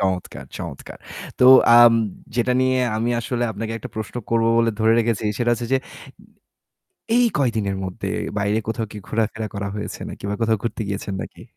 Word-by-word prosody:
চমৎকার, 95 -2 -2
চমৎকার। - - -8 0.4
তো 125 - +4 0.3
আম 120 -1 +8 0.4
যেটা 125 +1 +2
নিয়ে 130 0 +2 0.2
আমি 115 +2 0
আসলে 120 0 -2
আপনাকে 110 +2 -5
একটা - - -8
প্রশ্ন 110 +2 -5
করব 115 -1 +2
বলে 115 0 +3
ধরে 110 +1 +4
রেখেছি, 115 -2 0
সেটা 120 -1 +1
হচ্ছে 120 0 -2
যে - - +4 1.4
এই 245 0 +5
কয়দিনের 110 -7 0
মধ্যে 95 -1 -5 0.3
বাইরে 105 +2 +1
কোথাও 115 0 -2
কি 105 - -7
ঘোরাফেরা 110 0 -1
করা 100 0 -3
হয়েছে 105 - -6
নাকি - - -10
বা - - -1
কোথাও 115 -1 +2
ঘুরতে 115 -1 -3
গিয়েছেন 100 0 -4
নাকি? - - -11
115 Hz, 170 wpm, -22 LUFS, 105-120 Hz, 1.4 s, আম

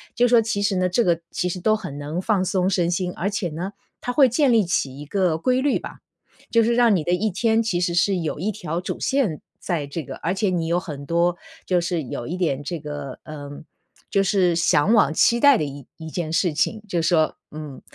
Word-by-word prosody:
就 245 +1 +4
说 240 -1 +5
其 220 -2 -2
实 205 -1 +1
呢 185 0 +2
这 210 +7 +2
个 170 -5 +2
其 180 - -1
实 180 - -4
都 215 +3 +3
很 180 -9 -6
能 150 +5 -4
放 195 -2 +1
松 185 0 +1
身 175 -3 +1
心， 180 0 -1
而 190 - -1
且 200 -4 -2
呢， 170 +5 -5 0.3
它 245 - -2
会 270 0 +6
建 270 +2 +3
立 220 -4 +4
起 140 -6 -1
一 145 - -7
个 180 0 +1
规 255 +8 +1
律 280 0 +2
吧， - - -9 0.5
就 230 -1 +4
是 235 +2 +2
让 235 -3 +5
你 165 - 0
的 175 - -1
一 215 +5 +1
天， 225 +3 +1
其 195 -6 -1
实 175 -1 0
是 185 +3 +2
有 160 -4 -3
一 195 +6 -1
条 175 -6 -4
主 185 - -4
线 250 - 0 0.2
在 170 -6 -2
这 155 +3 -5
个 - - -8
而 175 - -2
且 200 +1 0
你 170 -3 -1
有 170 +1 +1
很 145 -6 -8
多 170 +3 +1 0.3
就 180 -1 +2
是 170 -2 -2
有 120 -2 -5
一 175 - -4
点 145 -6 -1
这 170 +3 -4
个， 145 -2 -7
呃 145 -2 -8 0.6
就 195 - +3
是 185 -3 +2
向 165 +3 +3
往 210 -11 +4
期 235 +8 +3
待 285 0 +6
的 - - -1
一 140 -1 -8
一 160 0 -8
件 160 -1 -3
事 165 0 +1
情。 215 +8 0
就 175 -4 0
是 165 - 0
说， 160 -3 +2 0.2
嗯 150 -3 -8
180 Hz, 260 characters per minute, -23 LUFS, 160-210 Hz, 0.6 s, 会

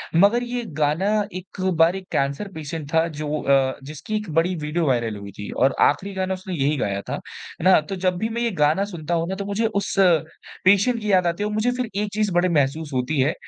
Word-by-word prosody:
मगर 205 +8 +4
ये 245 0 -3
गाना 155 +5 +1 0.3
एक 185 +1 -9 0.2
बार 165 +3 +5
एक 190 -1 -7
कैंसर 140 +9 -1
पेशेंट 155 -2 -6
था 165 +1 +3
जो 150 -1 -3
अ, 135 -1 +2
जिसकी 155 +9 -6
एक 210 -3 -6
बड़ी 170 +3 +2
वीडियो 160 +1 -1
वायरल 115 -4 0
हुई 100 0 -9
थी 105 - -6
और 130 +1 +2
आखिरी 190 +7 +2
गाना 190 0 -1
उसने 185 0 -6
यही 145 -1 +1
गाया 100 -5 -1
था। - - -6
है - - -10
ना? 185 -2 +7
तो 155 +6 -6
जब 185 -1 0
भी 220 +5 -1
मैं 235 +1 -3
ये 235 -1 +1
गाना 155 +2 +2
सुनता 175 -4 -5
हूँ 165 0 0
ना 190 - -2
तो 200 +1 -5
मुझे 205 +3 -1 0.2
उस - - -4 0.7
पेशेंट 200 +5 +4
की 210 -1 -1
याद 185 -2 +4
आती 170 +4 -1
है - - 0
और 210 - -4
मुझे 215 +3 +1
फ़िर 245 -2 -3
एक 210 - -2
चीज़ 210 -1 0
बड़ी 175 +1 +3
महसूस 150 0 0
होती 130 +3 -1
है 135 +4 +3
170 Hz, 235 wpm, -23 LUFS, 150-200 Hz, 0.7 s, ना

